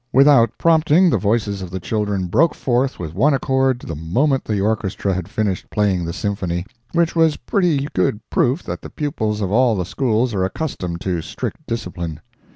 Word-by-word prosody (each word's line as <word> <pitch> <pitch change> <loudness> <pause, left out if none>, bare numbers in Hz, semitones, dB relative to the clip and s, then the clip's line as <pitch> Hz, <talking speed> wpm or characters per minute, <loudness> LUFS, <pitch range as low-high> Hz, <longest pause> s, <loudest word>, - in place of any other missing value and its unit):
Without 135 -3 +6
prompting, 165 +2 +4
the - - +2
voices 100 -2 0
of 90 - -6
the 95 +1 -4
children 105 -1 -1
broke 135 - +2
forth 130 +1 0
with 80 -3 -6
one 135 - +3
accord 130 -1 +1
the 85 - -6
moment 130 - +1
the 105 -2 -1
orchestra 100 -1 -1
had 90 0 -4
finished 105 -3 -2
playing 100 -4 +1
the 85 - -3
symphony, 90 -1 -2 0.3
which 170 0 +1
was 160 -2 +3
pretty 165 -8 0
good 95 +3 +1
proof 130 +8 +1
that - - -5
the - - -9
pupils 110 -9 -2
of 95 -2 -1
all 120 +1 +3
the 90 -3 -2
Schools 120 +3 0
are 95 -2 0
accustomed 95 - -3
to 90 -3 -1
strict - - -5
discipline. 85 -8 -4
110 Hz, 180 wpm, -20 LUFS, 95-135 Hz, 0.3 s, Without